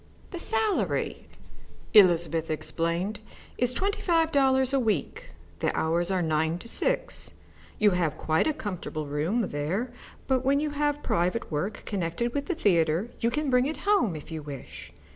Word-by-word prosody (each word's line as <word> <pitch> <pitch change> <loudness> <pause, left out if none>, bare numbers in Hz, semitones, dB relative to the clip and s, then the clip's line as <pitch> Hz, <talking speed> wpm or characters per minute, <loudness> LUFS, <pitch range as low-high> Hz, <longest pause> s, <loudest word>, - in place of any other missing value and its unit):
"The 350 - -5
salary," 440 +1 0 0.7
Elizabeth 170 -5 +5
explained, 170 +6 0 0.4
"is 245 0 +3
twenty 395 +10 -1
five 330 -2 +2
dollars 265 -1 +3
a 275 - +3
week. 215 - -2 0.3
The - - +1
hours 170 +2 +1
are 185 -2 +1
nine 160 +1 +1
to 205 - -10
six. - - -1 0.5
You 210 -1 +4
have 170 -4 0
quite 160 - +1
a 310 - +1
comfortable 180 - -5
room 165 +10 -1
there, 185 - -2 0.3
but 260 -1 +1
when 275 +1 +3
you 300 0 -1
have 295 0 -1
private 180 +7 0
work 180 +8 -3
connected 200 +5 -2
with 285 -1 -2
the 360 - -1
theatre 175 - +2
you 230 - +2
can 285 +3 -1
bring 250 +1 +4
it 310 - -4
home 390 - +3
if 155 - -9
you 160 -1 -4
wish. 145 -3 -9
210 Hz, 160 wpm, -27 LUFS, 165-275 Hz, 0.7 s, Elizabeth